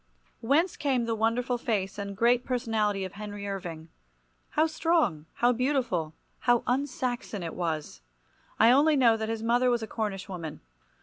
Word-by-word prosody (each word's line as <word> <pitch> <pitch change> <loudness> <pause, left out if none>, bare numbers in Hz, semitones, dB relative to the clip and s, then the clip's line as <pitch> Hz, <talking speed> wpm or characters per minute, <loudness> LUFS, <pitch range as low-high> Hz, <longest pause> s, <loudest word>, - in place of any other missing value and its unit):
Whence 300 +10 +2
came 260 -5 +1
the 230 - -1
wonderful 235 +3 0
face 205 -4 -2
and 200 -1 -5
great 240 +2 +3
personality 220 -6 0
of 185 - -7
Henry 205 0 -6
Irving? 170 -5 -6 0.7
How 310 - +5
strong, 315 - +1
how 240 +1 +3
beautiful, 240 - 0 0.2
how 240 -1 +3
un 265 +3 +1
Saxon 245 -7 -4
it 165 - -4
was! 155 - -3 0.6
I 225 +2 +7
only 295 +4 +5
know 240 -5 +5
that 220 0 -3
his 225 -1 -3
mother 240 +2 +3
was 240 -2 +1
a - - -4
Cornish 210 -4 -3
woman. 170 -5 -6
225 Hz, 165 wpm, -28 LUFS, 195-250 Hz, 0.7 s, I